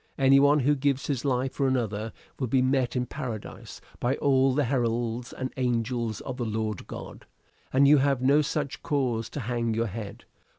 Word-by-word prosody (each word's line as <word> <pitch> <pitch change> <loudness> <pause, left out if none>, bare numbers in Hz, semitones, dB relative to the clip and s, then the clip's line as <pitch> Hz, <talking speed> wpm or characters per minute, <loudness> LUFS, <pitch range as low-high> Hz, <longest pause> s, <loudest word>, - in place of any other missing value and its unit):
Any 135 0 +5
one 145 +1 +5
who 145 +3 +3
gives 140 +1 0
his 135 -5 -2
life 130 -1 0
for 140 - 0
another 110 -4 -1 0.3
will 130 - -1
be 130 +2 +2
met 130 -1 +1
in 125 0 0
paradise 125 -5 -7 0.2
by 125 +3 +1
all 135 -2 +3
the 145 - +2
heralds 120 -1 -1
and 130 0 -5
angels 120 -3 -1
of 130 -2 -6
the 125 - -2
Lord 110 -2 -3
God. - - -9 0.4
And 140 +2 +5
you 150 +1 +7
have 135 -1 +2
no 140 +4 +4
such 150 -2 -3
cause 125 -7 -1
to 145 - -5
hang 115 -1 -1
your 115 +1 +1
head. 105 -1 -7
130 Hz, 185 wpm, -27 LUFS, 115-140 Hz, 0.4 s, you